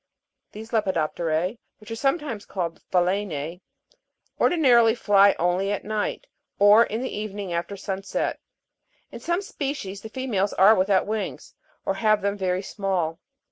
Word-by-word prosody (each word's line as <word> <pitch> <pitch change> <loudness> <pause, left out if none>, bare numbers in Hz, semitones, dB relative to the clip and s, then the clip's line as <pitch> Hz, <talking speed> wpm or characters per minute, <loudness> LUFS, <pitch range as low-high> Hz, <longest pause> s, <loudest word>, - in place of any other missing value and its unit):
These 220 +2 -10
lepidop' 190 -8 0
terae, 170 +6 -1 0.2
which 215 +1 -13
are - - -2
sometimes 270 -4 -1
called 170 -4 -4
phaloense, 180 -3 -1 0.8
ordinarily 240 -9 +4
fly 200 -3 +5
only 180 +3 +1
at 205 - -2
night 215 - -2 0.3
or 205 +3 +7
in 225 +4 -4
the 260 - -4
evening 205 -3 -5
after 170 +4 -3
sunset; 195 0 -3 0.7
in - - -8
some 345 +3 -1
species 275 - -5
the 220 - -8
females 215 -5 -1
are 195 +4 +6
without 190 -1 +2
wings, 220 +5 -4 0.3
or - - +1
have 215 0 +2
them 200 0 0
very 185 -1 -1
small. 185 -5 -2
200 Hz, 140 wpm, -24 LUFS, 185-225 Hz, 0.8 s, or